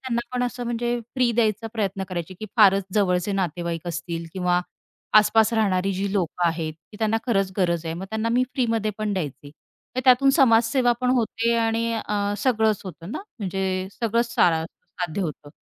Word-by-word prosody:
त्यांना 245 -3 -1
पण 250 - 0
असं 245 0 -3
म्हणजे 240 0 -1 0.2
फ्री 250 -2 +2
द्यायचा 225 -1 +1
प्रयत्न 195 -3 -2
करायचे 180 0 -5
की 215 - -5
फारच 195 -3 +6
जवळचे 185 -1 +1
नातेवाईक 170 -2 -2
असतील 170 0 -4
किंवा 180 -1 +1 0.6
आसपास 220 +1 +4
राहणारी 195 -3 +1
जी 195 +1 -2
लोकं 175 -2 0
आहेत, 160 -1 -3 0.2
की - - -10
त्यांना 220 0 +1
खरंच 195 -5 +1
गरज 170 -3 +1
आहे 160 - -2
मग 185 +3 -6
त्यांना 220 +1 -1
मी 250 +1 +3
फ्रीमध्ये 225 -4 0
पण 215 -1 -1
द्यायचे. 145 -5 -4 0.5
तर - - +2
त्यातून 265 +2 +6
समाजसेवा 240 -1 +4
पण 250 0 +2
होते 230 0 +1
आणि 230 0 0
अ, 205 -2 -1
सगळंच 220 -5 +2
होतं 180 0 -8
ना - - -3 0.2
म्हणजे 190 -2 -2
सगळंच 235 +1 -1
सा 160 -2 +3
साध्य 180 +1 -6
होतं 150 -3 -5
205 Hz, 175 wpm, -24 LUFS, 180-230 Hz, 0.6 s, फारच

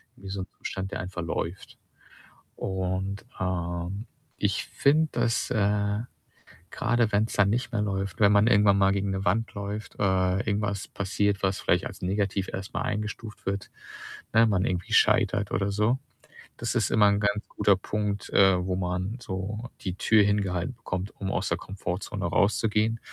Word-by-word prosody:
wie 95 - -10
so 95 0 -3
'n - - -6
Umstand 95 +1 -4
der - - -3
einfach 90 -1 -5
läuft. 85 +2 -4 0.8
Und, 95 +1 -3
ähm, 90 +2 -2 0.3
ich - - 0
finde, 155 +3 +2
dass, 115 - 0
äh, 105 -1 +1 0.7
grade 120 -2 +1
wenn's 105 +2 +2
dann 100 -2 +4
nicht 120 +2 -1
mehr 105 - +1
läuft, 100 -1 -3
wenn 105 -1 +6
man 105 +1 +5
irgendwann 105 -4 +5
mal 95 0 +4
gegen 100 0 0
'ne 95 0 -2
Wand 115 +5 +1
läuft, 100 +1 -5
äh, 95 -1 +2
irgendwas 100 -1 -1
passiert, 100 +1 0
was 95 -1 +1
vielleicht - - +1
als - - -7
negativ 100 0 0
erstmal 95 +1 -4
eingestuft 105 0 -4
wird, 100 0 -2 0.6
ne, 115 +1 +6
man 100 -4 +2
irgendwie 90 -1 -2
scheitert 105 0 +3
oder 100 0 0
so, 105 +5 +2 0.6
das - - -2
ist - - +1
immer 105 -2 +5
'n 100 0 +3
ganz 105 +1 0
guter 100 -2 +3
Punkt, 105 +1 -3
äh, 95 -2 +5
wo 90 -1 -1
man 90 +4 -2
so 105 +3 -4
die 95 -3 -3
Tür 105 +1 +4
hingehalten 100 -4 0
bekommt, 90 +3 -4
um 95 -1 -2
aus - - -1
der - - +1
Komfortzone 95 -1 -4
rauszugehen, 110 +2 +2
100 Hz, 165 wpm, -27 LUFS, 95-105 Hz, 0.8 s, wenn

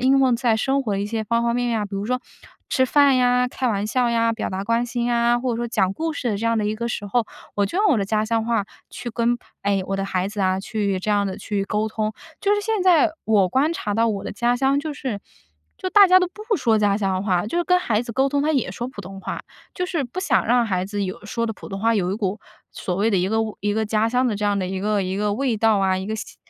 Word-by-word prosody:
应 265 +2 +4
用 260 -2 +4
在 235 -3 +2
生 270 +4 +1
活 215 -6 -2
的 195 - -1
一 205 - -2
些 220 0 -3
方 235 +1 +1
方 235 0 +1
面 245 0 0
面 230 - 0
啊， - - -1
比 - - -19
如 200 - -3
说 250 +1 -1 0.5
吃 260 -1 +2
饭 280 -1 +5
呀、 250 0 +3
开 255 0 -3
玩 205 -3 0
笑 245 +3 +1
呀、 230 0 +2
表 225 - -3
达 190 +1 -3
关 230 +3 0
心 240 0 -2
呀， 240 0 +2
或 255 0 -1
者 230 - -2
说 240 0 -2
讲 190 -5 +1
故 320 +7 -2
事 250 -5 -2
的 205 - -1
这 230 - -2
样 230 0 +2
的 215 - 0
一 210 +1 -1
个 235 +1 -3
时 210 -3 -3
候， 220 +3 0 0.3
我 200 -1 +2
就 215 - -5
用 420 - +4
我 255 - +3
的 200 - 0
家 215 +1 0
乡 225 0 0
话 225 -3 0 0.3
去 240 - -6
跟， 235 +1 +1 0.3
哎， 200 -1 +1
我 195 - -2
的 195 - -2
孩 185 -1 -1
子 205 0 -5
啊 190 0 +1
去 200 -3 -2
这 210 - -2
样 205 -1 +2
地 190 0 -4
去 205 -1 -2
沟 210 +1 -1
通。 215 0 -2 0.3
就 410 0 +3
是 415 - 0
现 435 -1 -1
在 350 -3 +5
我 205 -4 +3
观 280 - +2
察 210 -10 -3
到 230 +2 +2
我 205 -3 -2
的 - - -5
家 240 +3 +1
乡， 270 +2 +2
就 300 +1 -4
是 245 -8 -4 0.6
就 370 - -3
大 400 0 +8
家 370 0 +6
都 365 - +1
不 425 +3 -2
说 225 -7 +2
家 205 -1 +2
乡 195 -2 -1
话， 180 -3 +1
就 225 +11 -2
是 345 - +1
跟 360 - +4
孩 220 -9 +1
子 240 -1 -7
沟 270 +4 +2
通 285 0 0
他 305 +2 +1
也 260 -10 0
说 235 +6 -5
普 255 -5 -8
通 195 0 -9
话。 - - -4 0.3
就 360 - -2
是 335 -6 -2
不 245 +10 -5
想 385 - +1
让 240 +1 +3
孩 185 -4 -1
子 205 +1 -3
有 190 +1 -5
说 230 +2 -2
的 225 - -2
普 - - -11
通 195 -1 -5
话 230 +1 +3
有 185 -2 0
一 - - -2
股， 205 -1 -2 0.3
所 180 - -4
谓 210 +5 +1
的 195 - +2
一 180 +1 +1
个 220 +2 0 0.2
一 205 0 -1
个 220 - 0
家 215 +1 +1
乡 250 +2 +2
的 215 - -1
这 210 - -3
样 205 0 +2
的 195 - -1
一 190 - -3
个 205 +1 0
一 185 +1 -3
个 205 0 0
味 250 -1 0
道 220 -1 +3
啊， 190 -1 +2
一 190 - -5
个 220 - -2
吸 220 - -7
225 Hz, 315 characters per minute, -22 LUFS, 200-250 Hz, 0.6 s, 大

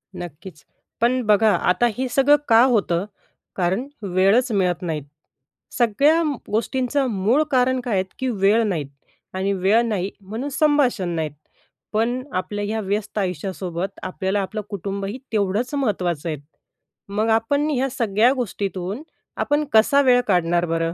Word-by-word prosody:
नक्कीच. 170 -2 -9 0.4
पण 250 +2 +2
बघा, 215 +1 +4
आता 180 +6 +2
हे 260 +1 -1
सगळं 270 +3 +5
का 230 0 +6
होतं? 200 -8 +1 0.5
कारण 190 +8 0
वेळच 200 +6 +2
मिळत 180 -4 +1
नाहीत. 160 -5 -3 0.7
सगळ्या 275 +8 +3
म 300 -3 -1 0.2
गोष्टींचं 260 +5 0
मूळ 220 +9 +2
कारण 255 0 +2
काय 245 -3 -3
आहेत 190 -1 +1
की 260 - -1
वेळ 210 +1 +3
नाहीत, 160 -8 -2 0.5
आणि 190 +1 -1
वेळ 195 +4 +3
नाही 200 -4 -1
म्हणून 220 +8 -5
संभाषण 280 - +2
नाहीत. 160 -2 -2 0.6
पण 235 +4 0
आपल्या 205 +3 -3
ह्या 220 +2 -2
व्यस्त 205 +1 -3
आयुष्यासोबत 185 0 -4
आपल्याला 190 +2 -1
आपलं 210 +3 -4
कुटुंबही 200 +2 -4
तेवढंच 215 +4 0
महत्त्वाचं 180 - -1
आहे. 155 - -3 0.7
मग 215 +3 0
आपण 225 +7 +2
ह्या 270 -2 0
सगळ्या 230 -2 +2
गोष्टीतून 200 - -4 0.3
आपण 295 +1 +1
कसा 225 +6 +5
वेळ 250 -2 +5
काढणार 175 -2 +2
बरं? 165 0 -1
210 Hz, 140 wpm, -22 LUFS, 185-250 Hz, 0.7 s, का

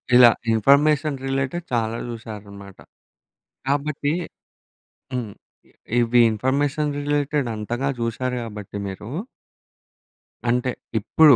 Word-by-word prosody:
ఇలా 125 -1 +10 0.2
information 140 +5 +4
related 135 +5 -1
చాలా 115 -1 +1
చూసారనమాట. 100 -4 -9 0.9
కాబట్టి 145 +1 0 1.0
హ్మ్. 120 -5 -3 0.7
ఇవి 120 +1 +4
ఇన్ఫర్మేషన్ 140 +6 0
రిలేటెడ్ 145 -1 0
అంతగా 120 +6 -2
చూశారు 125 +2 -1
గాబట్టి 105 -3 -7
మీరు 95 +2 -7 1.4
అంటే, 125 +1 +2 0.3
ఇప్పుడు 145 +5 +6
125 Hz, 85 wpm, -23 LUFS, 110-145 Hz, 1.4 s, ఇలా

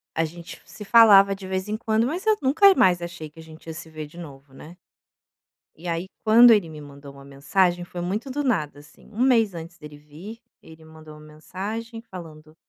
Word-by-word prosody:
a 165 - 0
gente 170 +2 -11
se 210 - -12
falava 200 -3 +6
de 190 -1 -11
vez 190 +1 -4
em 215 - -3
quando, 220 0 0
mas 335 - -4
eu 435 -1 +3
nunca 320 +9 +5
mais 180 - +3
achei 170 -2 -8
que 160 - -18
a - - -11
gente 160 0 -16
ia 160 - -6
se 160 +1 -11
ver 155 -1 -8
de 150 +4 -17
novo, 140 -4 -12
né. 165 +6 -14 1.0
E 175 +3 -11
aí 170 +2 -3 0.2
quando 230 +2 +7
ele 205 -7 +2
me 155 -1 -11
mandou 140 -1 -13
uma 140 0 -15
mensagem 175 +6 -1
foi 175 0 -8
muito 205 +9 -4
do 290 +2 -3
nada 155 - -2
assim, 145 - -20
1 220 +2 -5
mês 230 -6 +2
antes 165 +1 -10
dele 150 -3 -13
vir, 155 +10 -12 0.2
ele 160 0 -16
mandou 155 -1 -14
uma - - -15
mensagem 210 +9 -8
falando: 155 -7 -13
175 Hz, 215 wpm, -23 LUFS, 155-215 Hz, 1.0 s, quando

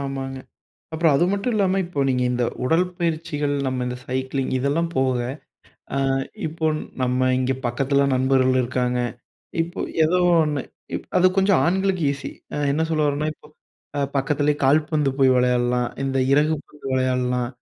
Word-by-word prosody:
ஆமாங்க, 135 -1 -4 0.5
அப்புறம் 160 -2 +3
அது 170 - +3
மட்டும் 200 +5 -1
இல்லாம, 195 -2 +2
இப்ப 150 -5 -1
நீங்க 125 -1 +1
இந்த 125 0 0 0.2
உடல்பயிற்சிகள், 165 -2 0
நம்ம 130 -1 -1
இந்த 125 0 -3
சைக்கிளிங். 130 +1 -2
இதெல்லாம் 145 +6 0
போக, 130 -1 +2 0.8
அ - - +1 0.5
இப்போ 160 +1 -2 0.4
நம்ம 125 0 +1 0.2
இங்க 130 0 +1
பக்கத்துல 140 +3 +1
நண்பர்கள் 130 0 +3
இருக்காங்க. 125 0 -1 0.6
இப்ப 170 +1 -4 0.2
ஏதோ 165 +4 +2 0.3
ஒன்னு 150 -2 -1 0.3
இப் - - -4
அது 180 - +5
கொஞ்சம் 195 -1 +4
ஆண்களுக்கு 190 0 +1
ஈஸி. 140 0 -6 0.2
அ - - -3 0.2
என்ன 155 +3 0
சொல்ல 155 -1 +1
வரேன்னா, 145 +1 0
இப்போ, 150 - -19 0.7
பக்கத்தில 145 +2 +1
கால்பந்து 150 +1 +2
போய் 135 -1 +5
விளையாடலாம், 125 -1 +2 0.2
இந்த 135 0 -1
இறகு 150 +3 +3
பந்து 150 - -13
விளையாடலாம், 125 -1 0
140 Hz, 145 wpm, -23 LUFS, 130-160 Hz, 0.8 s, அது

